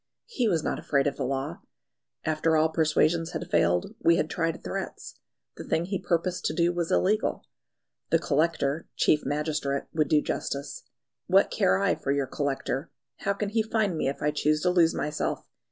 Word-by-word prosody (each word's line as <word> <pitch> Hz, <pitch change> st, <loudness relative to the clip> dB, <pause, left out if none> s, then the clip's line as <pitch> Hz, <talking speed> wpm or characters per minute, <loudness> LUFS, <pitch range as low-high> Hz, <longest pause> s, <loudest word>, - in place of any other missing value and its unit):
He 260 Hz, -, -1 dB
was 165 Hz, -6 st, +1 dB
not -, -, -2 dB
afraid 140 Hz, -2 st, +1 dB
of 145 Hz, -, 0 dB
the 135 Hz, -, -2 dB
law. 135 Hz, -7 st, -3 dB, 0.7 s
After 155 Hz, +1 st, +2 dB
all 155 Hz, +1 st, +3 dB
persuasions 160 Hz, +1 st, +1 dB
had -, -, -4 dB
failed, 85 Hz, +1 st, +2 dB
we 170 Hz, -, +4 dB
had 155 Hz, -, -1 dB
tried 165 Hz, -1 st, -2 dB
threats: -, -, -6 dB, 0.4 s
the -, -, -6 dB
thing 165 Hz, -, 0 dB
he 195 Hz, 0 st, -2 dB
purposed 175 Hz, 0 st, -1 dB
to -, -, 0 dB
do 175 Hz, 0 st, +2 dB
was 170 Hz, -1 st, -2 dB
illegal. 210 Hz, +3 st, +1 dB, 0.6 s
The 165 Hz, -, +4 dB
Collector 155 Hz, -1 st, 0 dB
(chief 150 Hz, -, +3 dB
magistrate) 145 Hz, -2 st, -1 dB
would 155 Hz, -2 st, +1 dB
do 150 Hz, -, +4 dB
justice. 140 Hz, -1 st, -4 dB, 0.5 s
"What -, -, +4 dB
care 95 Hz, -, +3 dB
I 100 Hz, -, +2 dB
for 135 Hz, -, -3 dB
your 140 Hz, -1 st, +1 dB
Collector? 135 Hz, +1 st, -2 dB, 0.3 s
How 200 Hz, -, -1 dB
can 200 Hz, 0 st, -3 dB
he 220 Hz, +2 st, +1 dB
find 220 Hz, -4 st, 0 dB
me 155 Hz, -, -1 dB
if 140 Hz, -, -5 dB
I 150 Hz, -, +2 dB
choose 150 Hz, +1 st, +1 dB
to 180 Hz, -, +2 dB
lose 170 Hz, -2 st, +4 dB
myself? 150 Hz, +1 st, -2 dB
155 Hz, 185 wpm, -27 LUFS, 140-170 Hz, 0.7 s, we